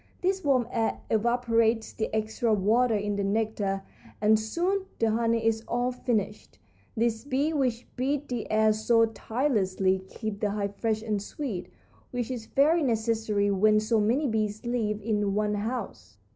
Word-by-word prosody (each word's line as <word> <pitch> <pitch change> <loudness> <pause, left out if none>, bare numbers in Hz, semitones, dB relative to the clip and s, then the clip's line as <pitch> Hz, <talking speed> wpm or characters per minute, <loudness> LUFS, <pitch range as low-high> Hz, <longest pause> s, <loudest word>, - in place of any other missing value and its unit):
This 380 +1 0
warm 255 -5 +2
air 225 -1 0
evaporates 230 0 +2
the 220 - -2
extra 220 +1 +1
water 225 +4 +3
in 205 0 -1
the 200 - 0
nectar, 200 -1 -1 0.4
and 215 +1 +4
soon 360 - -1
the 225 -1 +2
honey 230 0 +1
is 225 0 +1
all 245 +1 0
finished. 210 - -3 0.4
These 225 -1 0
bees 285 +3 0
which 250 -5 0
beat 275 +3 -1
the 245 -3 -4
air 215 0 +4
so 230 +1 +3
tirelessly 210 -6 0
keep 215 -3 -5
the 210 - 0
hive 200 -1 -3
fresh 220 0 -1
and 210 -3 -1
sweet, 205 - -5 0.4
which 245 0 -3
is 235 -3 -5
very 310 +5 +3
necessary 220 -5 +1
when 215 +2 +4
so 215 +1 +1
many 245 +8 +2
bees 215 -2 -1
live 220 -3 -1
in 205 -2 0
one 210 0 +1
house. 225 +5 -4
225 Hz, 160 wpm, -27 LUFS, 210-245 Hz, 0.4 s, and